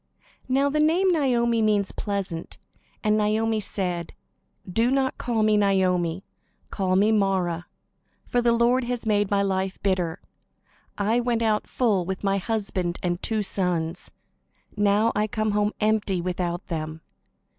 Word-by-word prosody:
Now 270 +2 +3
the 295 +2 0
name 345 +5 +3
Naomi 240 -7 +2
means 210 -2 +2
"pleasant." 195 -5 -4 0.5
And 210 -1 +3
Naomi 220 +1 +1
said: 180 -4 -2 1.1
"Call 230 -3 0
me 215 0 +4
not 200 -1 +3
Naomi; 180 -1 0 0.5
call 185 -2 0
me 205 +3 +4
Mara, 190 -5 0 0.6
for 245 - 0
the 240 0 +3
Lord 240 +2 +3
has 245 -1 -3
made 205 -2 +2
my 200 -1 +2
life 190 -1 -1
bitter. 185 -3 0 0.8
I 215 +4 +1
went 240 -1 0
out 215 -1 +1
full, 215 -7 +1
with 190 +2 -5
my 195 0 +1
husband 190 -4 -2
and 175 0 -1
two 220 -2 -1
sons; 180 -3 -2 0.7
now 205 +2 +3
I 210 +1 +1
come 215 0 -1
home 210 0 +1
empty, 210 -3 +1
without 175 +1 -3
them. 160 -2 -5
205 Hz, 140 wpm, -25 LUFS, 185-225 Hz, 1.1 s, me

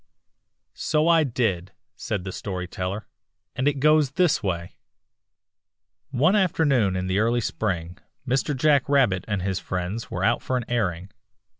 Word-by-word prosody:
"So 155 +1 0
I 165 -2 +5
did," 110 - -1 0.2
said 105 -5 -3
the 95 - -5
Story 90 -2 -5
Teller, 95 +3 -4 0.5
"and 130 - 0
it 145 -1 +1
goes 150 -1 +3
this 175 -4 +2
way: 85 -4 -3 0.7
" - - -61 0.2
"One 185 +6 +5
afternoon 145 - +2
in 90 0 -2
the 95 +2 0
early 115 +2 +2
spring 90 -6 -3 0.3
Mr. 135 +2 0
Jack 145 0 +3
Rabbit 125 -10 +3
and 105 -4 -2
his 95 -1 -1
friends 95 +5 -4
were - - -3
out 115 - +2
for 130 - -1
an 120 - -3
airing. 95 -6 -2
115 Hz, 155 wpm, -24 LUFS, 95-140 Hz, 0.7 s, I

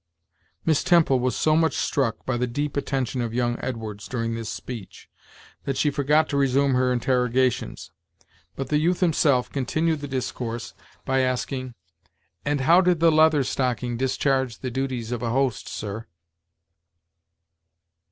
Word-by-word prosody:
Miss 160 -3 +2
Temple 165 -7 +4
was 125 0 0
so 155 0 +2
much 160 0 +2
struck 120 -6 -1
by 130 - -1
the 125 +1 0
deep 145 +4 -3
attention 135 -3 -1
of 115 -1 -3
young 120 -1 0
Edwards 110 -4 -5
during 115 -2 -2
this 115 -1 -4
speech 115 -6 -8 0.6
that 135 -1 -2
she 150 - +2
forgot 150 +3 +2
to 140 - -1
resume 140 0 +2
her 125 0 +2
interrogations; 125 0 0 0.6
but 135 -1 -5
the 150 - +2
youth 175 +3 +1
himself 145 -7 +2
continued 155 +4 0
the 145 - -6
discourse 120 -3 -4 0.3
by 130 0 +1
asking: 130 0 -2 0.7
"And 145 -1 0
how 170 +7 +6
did 180 -3 +2
the 165 0 +5
Leather 155 -2 +4
Stocking 125 -2 -1
discharge 130 -1 0
the 130 - -3
duties 125 -3 -3
of 120 -2 -3
a 120 - -1
host 130 -2 0
sir?" 105 +1 -6
130 Hz, 150 wpm, -24 LUFS, 120-145 Hz, 0.7 s, how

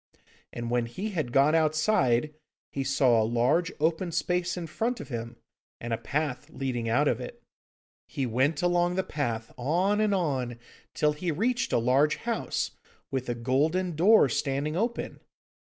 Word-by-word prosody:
And 120 0 -5
when 120 -1 +1
he 190 - -4
had 155 -10 -2
got 140 +4 +4
outside, 155 - +2 0.4
he 135 - -2
saw 130 -4 +3
a - - +2
large 120 +10 +1
open 165 +3 0
space 180 +1 -1
in 175 - -4
front 225 +10 -2
of - - -8
him, 115 -1 -5 0.4
and 120 0 -4
a - - 0
path 145 +2 -3
leading 125 -6 -3
out 140 +6 +3
of 125 -1 0
it. 125 - -9 0.6
He 135 - -2
went 135 +7 +1
along 175 0 +2
the 190 - +1
path, 120 -9 -3
on 180 - +1
and 210 -2 +2
on, 130 -9 -1 0.4
till 150 0 +2
he 170 +4 -3
reached 235 - 0
a - - +3
large 130 +6 +3
house, 235 -1 -2 0.4
with 130 -2 -2
a 120 - -1
golden 155 +9 0
door 190 +1 +6
standing 140 +4 -1
open. 230 +6 -2
150 Hz, 165 wpm, -28 LUFS, 125-175 Hz, 0.6 s, door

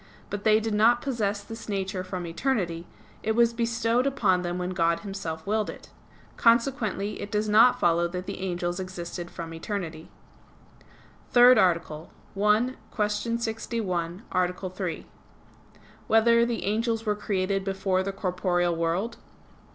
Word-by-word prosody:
But 205 0 -4
they 215 0 +5
did 220 0 -2
not 230 +3 +4
possess 210 -6 -1
this 225 +1 -9
nature 190 -2 -2
from 185 -1 -5
eternity; 170 -3 -2 0.3
it 220 - 0
was 235 0 +4
bestowed 230 +2 +1
upon 205 -10 +2
them 175 0 -3
when 180 0 -3
God 170 -2 +1
Himself 195 -6 -5
willed 215 +1 0
it. - - -10 0.5
Consequently 230 -4 +1
it 205 - -6
does 210 0 0
not 220 +4 +6
follow 170 0 +3
that 180 +1 -5
the - - -6
angels 175 -1 -2
existed 175 -1 -6
from 165 -1 -7
eternity. 165 -2 -5 0.7
_______________________ - - -24 0.5
THIRD 245 +1 +7
ARTICLE 170 -3 +1 0.3
[I, 210 +5 +2 0.2
Q. 210 +2 -1
61, 220 -6 -3
Art. 185 0 -1
3] 185 -4 -4 1.0
Whether 235 +1 +4
the 235 -1 -2
Angels 225 +2 0
Were 210 -1 +1
Created 195 -1 -1
Before 195 -1 0
the 195 +1 -2
Corporeal 180 -2 0
World? 170 +7 -1
200 Hz, 145 wpm, -26 LUFS, 180-225 Hz, 1.0 s, THIRD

